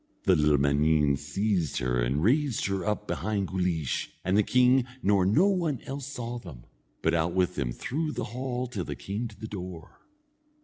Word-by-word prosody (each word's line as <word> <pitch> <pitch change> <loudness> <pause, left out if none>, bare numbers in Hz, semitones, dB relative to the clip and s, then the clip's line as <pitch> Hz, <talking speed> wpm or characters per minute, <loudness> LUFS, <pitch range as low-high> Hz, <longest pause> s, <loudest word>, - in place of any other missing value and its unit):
The 95 - +4
little 75 -2 +4
man_een_ 70 +1 +3
seized 85 +4 -1
her 60 0 0
and 65 +6 0
raised 135 +3 +2
her 95 -2 -1
up 105 +1 -1
behind 100 0 -2
Guleesh, 90 -6 -1 0.2
and 95 +2 +2
the 105 - +6
king 125 +3 +4 0.2
nor 95 -2 +3
no 135 - +4
one 170 - +1
else 135 0 -5
saw 120 -3 -5
them, 75 - -11 0.4
but 80 - +2
out 85 +1 +1
with 90 -1 +2
them 70 -7 -2
through 150 - -3
the - - -3
hall 125 0 -2
till 115 -7 -4
they 75 - -5
came 100 - -4
to 105 -2 -15
the 110 - -6
door. 90 -5 -8
95 Hz, 185 wpm, -28 LUFS, 80-120 Hz, 0.4 s, the